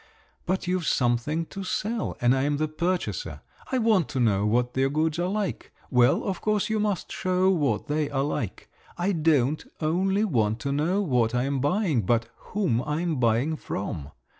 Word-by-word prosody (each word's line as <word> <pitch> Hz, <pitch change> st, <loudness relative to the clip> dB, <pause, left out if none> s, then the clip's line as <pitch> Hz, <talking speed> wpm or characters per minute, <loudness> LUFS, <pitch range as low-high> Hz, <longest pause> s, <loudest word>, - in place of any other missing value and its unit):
But 190 Hz, +2 st, 0 dB
you've 180 Hz, -2 st, -1 dB
something 125 Hz, +7 st, +1 dB
to 195 Hz, -, -5 dB
sell, 215 Hz, +4 st, -2 dB
and 120 Hz, +2 st, +4 dB
I'm 145 Hz, +2 st, +1 dB
the 155 Hz, +1 st, 0 dB
purchaser. 175 Hz, -, -2 dB, 0.3 s
I 260 Hz, -, +2 dB
want 220 Hz, -8 st, +3 dB
to 135 Hz, -, -2 dB
know 105 Hz, -4 st, +2 dB
what 120 Hz, +3 st, +1 dB
your 135 Hz, +1 st, +2 dB
goods 155 Hz, +3 st, 0 dB
are 175 Hz, -, +1 dB
like. 200 Hz, 0 st, -3 dB, 0.2 s
Well, 125 Hz, 0 st, +4 dB
of 190 Hz, -3 st, -3 dB
course, 215 Hz, 0 st, 0 dB
you 220 Hz, -, +1 dB
must 210 Hz, -3 st, -1 dB
show 185 Hz, +1 st, +2 dB
what 145 Hz, -, 0 dB
they 150 Hz, 0 st, -1 dB
are 135 Hz, -1 st, 0 dB
like. 140 Hz, -8 st, -3 dB, 0.3 s
I 180 Hz, +3 st, +1 dB
don't 155 Hz, -4 st, +2 dB, 0.2 s
only 190 Hz, +6 st, +1 dB
want 110 Hz, -, +1 dB
to 140 Hz, -, -2 dB
know 170 Hz, +8 st, +1 dB
what 125 Hz, -, +1 dB
I'm 135 Hz, +2 st, 0 dB
buying, 155 Hz, -, +1 dB
but 115 Hz, +3 st, +1 dB
whom 185 Hz, -, -1 dB
I'm 155 Hz, +2 st, -1 dB
buying 120 Hz, +6 st, +2 dB
from. 80 Hz, -, -5 dB
155 Hz, 175 wpm, -26 LUFS, 125-185 Hz, 0.3 s, and